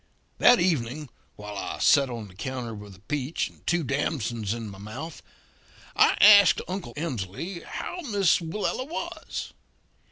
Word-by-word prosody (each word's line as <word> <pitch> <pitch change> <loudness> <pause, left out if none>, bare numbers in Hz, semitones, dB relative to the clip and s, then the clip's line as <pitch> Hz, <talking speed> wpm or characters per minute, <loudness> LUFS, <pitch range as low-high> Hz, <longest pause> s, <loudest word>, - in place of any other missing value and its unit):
"That 245 -1 +7
evening, 150 -4 0 0.3
while 105 0 -8
I - - -4
set 140 -2 +4
on 115 -3 -6
the 95 - -16
counter 125 +3 -5
with 105 -2 -10
a 90 - -20
peach 145 +1 -2
and - - -23
two 175 -1 +2
damsons 125 -6 -2
in 115 -1 -4
my 100 -2 -10
mouth, 130 +11 -8 0.7
I - - +5
asked 200 -1 +8
Uncle 185 0 -5
Emsley 155 - -4
how 360 - -6
Miss 200 -5 +3
Willella 200 +9 -3
was. 335 - -5
140 Hz, 150 wpm, -26 LUFS, 110-175 Hz, 0.7 s, asked